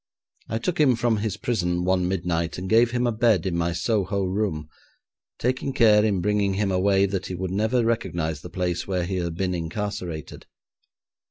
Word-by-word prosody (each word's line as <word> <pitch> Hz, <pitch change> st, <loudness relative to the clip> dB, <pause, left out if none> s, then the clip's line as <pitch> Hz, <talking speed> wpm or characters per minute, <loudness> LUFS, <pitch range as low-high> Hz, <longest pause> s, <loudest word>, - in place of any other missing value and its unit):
I 110 Hz, -, -1 dB
took 165 Hz, +10 st, -2 dB
him 135 Hz, -5 st, +5 dB
from 115 Hz, -1 st, +1 dB
his 105 Hz, -1 st, -2 dB
prison 90 Hz, -6 st, -1 dB
one 90 Hz, -1 st, +2 dB
midnight, 85 Hz, -2 st, -1 dB
and 90 Hz, +1 st, -5 dB
gave 115 Hz, +3 st, +4 dB
him 125 Hz, 0 st, 0 dB
a 120 Hz, -, +2 dB
bed 110 Hz, -6 st, +2 dB
in 90 Hz, -3 st, -1 dB
my 85 Hz, 0 st, 0 dB
Soho 100 Hz, +3 st, 0 dB
room, 95 Hz, -5 st, -2 dB, 0.7 s
taking 130 Hz, +2 st, -1 dB
care 110 Hz, -4 st, +5 dB
in 100 Hz, -4 st, +1 dB
bringing 100 Hz, 0 st, +1 dB
him 100 Hz, -1 st, 0 dB
away 95 Hz, +1 st, +3 dB
that 95 Hz, -1 st, -3 dB
he 90 Hz, -, -4 dB
would 95 Hz, 0 st, -4 dB
never 110 Hz, +5 st, +1 dB
recognise 85 Hz, -10 st, -1 dB
the -, -, -9 dB
place 90 Hz, -2 st, -2 dB
where 90 Hz, -3 st, -1 dB
he 95 Hz, +1 st, -2 dB
had 85 Hz, -2 st, -2 dB
been 90 Hz, +1 st, -1 dB
incarcerated. 85 Hz, -1 st, -5 dB
95 Hz, 185 wpm, -24 LUFS, 90-110 Hz, 0.7 s, him